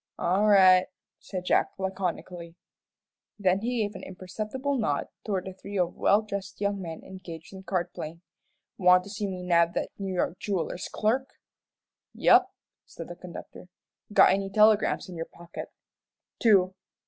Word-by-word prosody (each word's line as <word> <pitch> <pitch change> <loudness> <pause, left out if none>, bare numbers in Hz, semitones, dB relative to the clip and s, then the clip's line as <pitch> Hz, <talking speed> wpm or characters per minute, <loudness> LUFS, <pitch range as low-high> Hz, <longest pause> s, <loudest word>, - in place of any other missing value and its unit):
"All 195 +4 +2
right," 185 -2 +7 0.3
said 185 -1 -6
Jack, - - +2
laconically, 180 -3 -4 0.8
then 190 -2 +2
he 235 +1 0
gave 205 0 -3
an 190 - -8
imperceptible 215 +9 -4
nod 210 - -1
toward 190 -3 -2
a 190 - -6
trio 190 -1 -2
of - - -19
well 205 +2 +3
dressed 200 -2 -6
young 200 -1 -1
men 165 -3 -7
engaged 180 -3 -10
in 190 - -9
card 185 -3 -2
playing. 165 +3 -7 0.6
"Want 180 -1 +6
to 200 - -10
see 205 0 -3
me 185 -2 -5
nab 170 -1 +3
that - - -2
New 195 -2 -3
York 175 0 -1
jeweller's 185 -3 -2
clerk?" 245 +5 0 0.9
"Yep," - - +5 0.4
said 165 - -9
the 175 - -7
conductor. 180 0 -10 0.4
"Got - - +7
any 195 0 0
telegrams 215 +1 +4
in 180 - -9
your 165 0 -4
pocket?" 170 0 -9 0.7
"Two." 190 -5 +4
190 Hz, 155 wpm, -27 LUFS, 180-205 Hz, 0.9 s, right